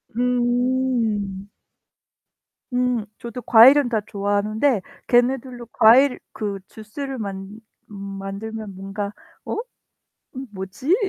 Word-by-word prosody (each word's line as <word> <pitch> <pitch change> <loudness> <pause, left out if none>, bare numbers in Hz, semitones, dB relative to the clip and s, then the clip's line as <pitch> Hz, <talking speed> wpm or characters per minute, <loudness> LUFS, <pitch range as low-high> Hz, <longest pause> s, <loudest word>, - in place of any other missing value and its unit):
음. 245 -5 0 1.3
음. 250 -3 +1
저도 235 +1 -7
과일은 245 +4 +7
다 220 -3 +1
좋아하는데 205 +3 0 0.3
걔네들도 245 -1 +1
과일 250 +4 +6
그 200 -2 -4
주스를 260 +5 -7
만 200 0 -6 0.3
음 - - -8 0.2
만들면 205 +1 -6
뭔가 200 +1 -4 0.3
어? - - -4 0.8
음 265 0 -5
뭐지? 200 - -1
225 Hz, 185 characters per minute, -22 LUFS, 205-250 Hz, 1.3 s, 과일은